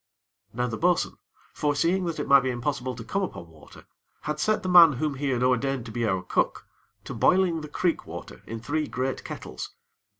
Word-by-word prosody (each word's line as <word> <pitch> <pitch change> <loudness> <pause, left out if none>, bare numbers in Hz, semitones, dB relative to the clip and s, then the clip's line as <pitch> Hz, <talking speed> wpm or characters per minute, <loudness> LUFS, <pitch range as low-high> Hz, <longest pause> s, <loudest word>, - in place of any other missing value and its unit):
Now 125 +3 -1
the 115 -2 -4
bo'sun, 175 +1 +1 0.4
foreseeing 165 +6 +1
that 165 -3 -3
it 145 - -3
might 140 0 +8
be 130 0 -2
impossible 130 +1 -2
to 115 - -8
come 200 - -2
upon 85 - -5
water, 80 -1 -16 0.4
had 150 0 -3
set 215 +5 +1
the - - -3
man 170 -3 +9
whom 150 +3 -1
he 140 +1 -2
had 125 -2 0
ordained 130 0 +1
to 115 - -8
be 115 0 -1
our 95 -2 0
cook, - - 0 0.4
to - - -7
boiling 180 -3 +3
the 150 - -7
creek 170 +2 -1
water - - -9
in 115 0 -5
three 150 +5 -1
great 130 +1 -3
kettles. - - -7
140 Hz, 200 wpm, -26 LUFS, 125-165 Hz, 0.4 s, man